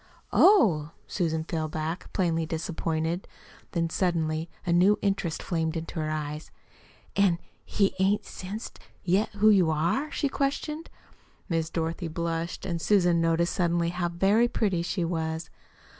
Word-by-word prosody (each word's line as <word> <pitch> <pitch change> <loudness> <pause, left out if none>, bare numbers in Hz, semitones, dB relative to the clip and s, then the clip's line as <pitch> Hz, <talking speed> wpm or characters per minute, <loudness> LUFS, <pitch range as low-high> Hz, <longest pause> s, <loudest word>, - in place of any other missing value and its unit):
"Oh!" 170 - +5
Susan 160 -4 -1
fell 160 -1 -2
back, 155 +3 -4
plainly 165 -4 0
disappointed. 165 +1 -2 0.5
Then, 165 -1 +1
suddenly, 160 -3 0 0.2
a 170 - +1
new 185 +4 +5
interest 195 -5 -1
flamed 165 -2 -1
into 165 0 -5
her 155 0 -1
eyes. 150 0 -4 0.7
"An' 195 -4 +4 0.3
he 200 -2 +1
ain't 195 +2 +2
sensed 200 +5 -7 0.2
yet 190 +4 +2
who 215 +1 +5
you 185 -5 +4
are?" 170 - 0
she 290 - 0
questioned. 295 +4 -2 0.6
Miss 165 -2 0
Dorothy 165 +1 -2
blushed, 165 +1 -3
and 170 -3 -2
Susan 175 -4 +3
noticed 165 +1 +2
suddenly 170 -2 +1
how 175 0 -1
very 195 +7 +3
pretty 200 -7 0
she 175 0 -1
was. 160 -1 -3
170 Hz, 140 wpm, -27 LUFS, 160-195 Hz, 0.7 s, Oh